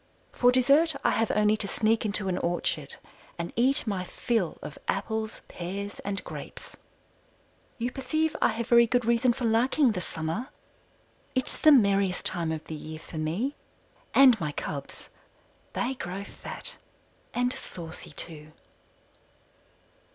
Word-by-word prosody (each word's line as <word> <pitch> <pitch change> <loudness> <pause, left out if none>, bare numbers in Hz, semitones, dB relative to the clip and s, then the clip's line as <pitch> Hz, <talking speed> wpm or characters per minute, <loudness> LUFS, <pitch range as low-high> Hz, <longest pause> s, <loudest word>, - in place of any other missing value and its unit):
For 245 0 +4
dessert 280 +5 +4
I - - +4
have 225 -1 +1
only 210 0 +3
to 200 - -1
sneak 220 +1 +1
into 205 -1 -1
an 185 -1 0
orchard 165 -4 -1 0.4
and 170 0 -4
eat 260 +4 +4
my 195 -4 -1
fill 210 0 -1
of 145 - -8
apples, 220 0 -2
pears, 195 +4 -5
and 200 0 -4
grapes. - - -8 1.0
You 245 0 -2
perceive 305 +5 -1
I - - +6
have 230 +1 -2
very 235 -1 +6
good 245 0 +1
reason 235 +1 +3
for 240 +1 -3
liking 240 +4 +3
the 180 - -3
summer. 165 - -3 0.9
It's 255 - 0
the 310 - +6
merriest 200 -7 +4
time 170 -3 +2
of 160 -1 -4
the - - -8
year 155 +1 -7
for 160 0 -8
me, 180 - -1 0.6
and 255 -5 +7
my 150 -2 -1
cubs. 145 0 -6 0.6
They 245 +2 -1
grow 195 -5 -5
fat - - -5 0.6
and 245 +1 +1
saucy, 165 -1 -8
too. 155 -2 -5
215 Hz, 145 wpm, -28 LUFS, 175-245 Hz, 1.0 s, and